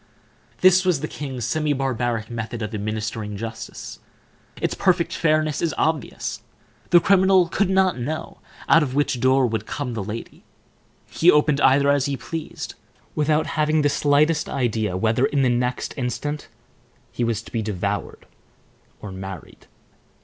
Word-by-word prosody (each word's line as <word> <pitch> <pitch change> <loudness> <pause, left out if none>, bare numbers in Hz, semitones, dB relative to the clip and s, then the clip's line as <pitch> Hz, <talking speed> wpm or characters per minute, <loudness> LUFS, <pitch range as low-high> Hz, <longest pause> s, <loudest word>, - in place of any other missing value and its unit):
This 185 0 +6
was 180 -7 +1
the 155 - -2
king's 130 -7 -5
semi 150 +2 0
barbaric 120 -4 -1
method 115 0 -4
of 105 - -5
administering 105 0 -3
justice. 110 +1 -7 0.6
Its - - -1
perfect 185 -3 +1
fairness 155 -2 +1
is 160 -6 0
obvious. 155 -5 -2 0.5
The 175 - +7
criminal 190 -1 +4
could 190 +3 0
not 190 -6 +2
know 155 +6 -5 0.3
out 165 - +6
of 135 -3 -2
which 145 -3 +1
door 130 +1 +4
would 110 -3 -2
come 140 -4 -4
the 110 -3 -3
lady; 105 +3 -7 0.6
he 170 - +3
opened 150 -2 +4
either 140 +1 +5
he 140 0 -1
pleased, 165 +2 -6 0.4
without 150 +1 +1
having 155 0 +1
the 145 - +3
slightest 150 +2 +2
idea 110 -7 -1
whether, 115 +6 +2
in 140 -2 +1
the 130 - +3
next 125 +1 -1
instant, 145 +3 -3 0.6
he 120 - -2
was 115 -2 -1
to - - -13
be 115 - -1
devoured 100 -1 -3 0.8
or 105 - -6
married. 95 -2 -9
135 Hz, 150 wpm, -23 LUFS, 115-155 Hz, 0.8 s, The